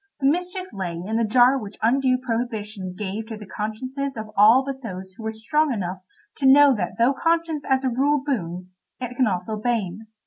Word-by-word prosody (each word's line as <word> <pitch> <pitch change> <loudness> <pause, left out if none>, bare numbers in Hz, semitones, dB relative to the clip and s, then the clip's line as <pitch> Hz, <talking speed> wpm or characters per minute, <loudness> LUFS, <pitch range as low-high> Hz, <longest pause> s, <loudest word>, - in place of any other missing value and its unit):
The 270 - -2
mischief 360 +3 -3
lay 190 -4 -3
in 195 +7 -3
the 230 - +2
jar 245 +4 +4
which 210 -3 -9
undue 255 +2 +3
prohibition 220 -6 -4
gave 210 +2 -4
to 220 -1 -6
the 210 - -10
consciences 255 +7 -4
of 215 0 -6
all 225 +6 +6
but 275 -1 -5
those 190 -5 -7
who 210 - -13
were 220 0 -3
strong 290 +8 0
enough 190 -5 -3 0.4
to 270 - +2
know 280 +1 +7
that 210 -5 -2
though 235 +4 +4
conscience 330 0 0
as 265 0 +2
a 260 - +2
rule 275 +3 +1
boons, 185 - -3 0.3
it 250 -1 -5
can 255 -1 +3
also 195 +3 -2
bane. 220 -2 -2
230 Hz, 200 wpm, -23 LUFS, 210-270 Hz, 0.4 s, know